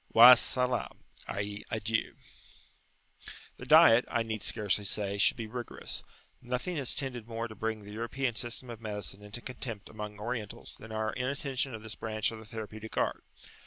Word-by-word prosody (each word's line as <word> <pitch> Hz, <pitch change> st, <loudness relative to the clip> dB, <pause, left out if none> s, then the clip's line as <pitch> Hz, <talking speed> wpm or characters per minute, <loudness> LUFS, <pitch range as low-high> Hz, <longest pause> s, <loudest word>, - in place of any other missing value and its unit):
[FN#14]" 125 Hz, +1 st, +7 dB, 2.6 s
The -, -, -8 dB
diet, 115 Hz, +2 st, +8 dB
I 120 Hz, -2 st, +1 dB
need 110 Hz, -2 st, -3 dB
scarcely 105 Hz, -2 st, +1 dB
say, 100 Hz, 0 st, -1 dB
should -, -, +4 dB
be 115 Hz, -, -3 dB
rigorous; 120 Hz, +2 st, -4 dB, 0.4 s
nothing 125 Hz, +8 st, -2 dB
has 135 Hz, -4 st, +1 dB
tended 125 Hz, -5 st, -2 dB
more 115 Hz, 0 st, -3 dB
to 110 Hz, -, -9 dB
bring 110 Hz, 0 st, -3 dB
the 105 Hz, -, -9 dB
European 120 Hz, +3 st, -1 dB
system 120 Hz, +2 st, -3 dB
of 115 Hz, -1 st, -9 dB
medicine 105 Hz, -2 st, -4 dB
into 105 Hz, +3 st, -7 dB
contempt 120 Hz, -5 st, -6 dB
among 105 Hz, -1 st, -7 dB
Orientals 110 Hz, -1 st, -4 dB
than 110 Hz, -, -11 dB
our 110 Hz, 0 st, -1 dB
inattention 135 Hz, 0 st, -1 dB
to -, -, -3 dB
this 110 Hz, 0 st, -7 dB
branch 110 Hz, 0 st, -1 dB
of 115 Hz, -, -7 dB
the 110 Hz, -, -11 dB
therapeutic 110 Hz, 0 st, -7 dB
art. -, -, 0 dB
115 Hz, 155 wpm, -31 LUFS, 110-125 Hz, 2.6 s, diet